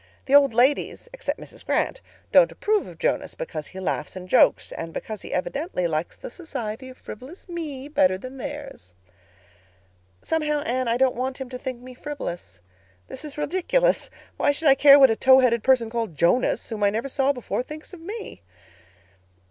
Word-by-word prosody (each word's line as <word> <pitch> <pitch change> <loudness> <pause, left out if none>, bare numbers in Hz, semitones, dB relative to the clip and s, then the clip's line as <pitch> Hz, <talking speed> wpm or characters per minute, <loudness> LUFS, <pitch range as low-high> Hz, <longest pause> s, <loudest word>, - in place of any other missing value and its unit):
The 270 - -2
old 285 -2 +7
ladies—except 290 - 0
Mrs. - - -11
Grant—don't - - +1
approve 425 -1 0
of - - -11
Jonas, - - -1
because 485 - -5
he 190 - -9
laughs 180 -4 -3
and 185 -1 -8
jokes—and 165 -2 +2
because 215 -2 -5
he - - -9
evidently 230 - -2
likes 160 0 -2
the - - -8
society 255 -6 -6
of 255 - -13
frivolous 265 - -11
me 305 -6 -5
better 185 -11 +2
than 255 +6 -9
theirs. 265 - -8 1.3
"Somehow, 300 -2 0
Anne, 255 -4 -1
I 230 +1 +2
don't 260 0 +3
want 255 +2 -3
him 265 -2 -6
to 250 -1 -7
think 255 -2 -5
me 255 0 -10
frivolous. 175 - -7 0.5
This 265 - -7
is 300 -1 -8
ridiculous. 370 - +1 0.3
Why - - +3
should 295 +1 +2
I - - +9
care 280 +1 +8
what 270 -4 +7
a - - +1
tow 260 +3 +6
haired 240 -3 +3
person 235 -2 +3
called 230 -8 -3
Jonas, 175 - +2
whom 220 -3 -5
I 205 - +4
never 225 +6 -2
saw 275 +1 +1
before 250 -2 -3
thinks 305 +7 -10
of 350 - -10
me? 415 - -7
260 Hz, 175 wpm, -24 LUFS, 225-300 Hz, 1.3 s, I